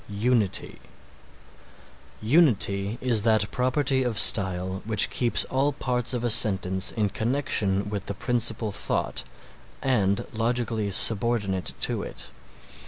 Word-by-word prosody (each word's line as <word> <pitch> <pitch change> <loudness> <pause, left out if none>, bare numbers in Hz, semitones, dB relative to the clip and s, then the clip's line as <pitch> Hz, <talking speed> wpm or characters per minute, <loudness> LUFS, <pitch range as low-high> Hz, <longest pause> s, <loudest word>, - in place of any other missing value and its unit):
UNITY 105 0 -1 1.4
Unity 110 - +1
is 120 -4 +1
that 110 -1 +1
property 130 +1 0
of 120 -4 -2
style 95 -3 +2
which 110 -1 +3
keeps 120 -2 +2
all 135 +2 -1
parts 125 -3 -2
of 120 - -4
a 120 - 0
sentence 95 -4 +2
in 105 -2 0
connection 110 -4 -1
with 100 -2 -6
the 100 - -5
principal 115 -1 -2
thought - - -3 0.6
and 100 -7 0
logically 115 -2 -2
subordinate 100 -2 +2
to - - -2
it. 60 - -7
110 Hz, 115 wpm, -25 LUFS, 100-125 Hz, 1.4 s, which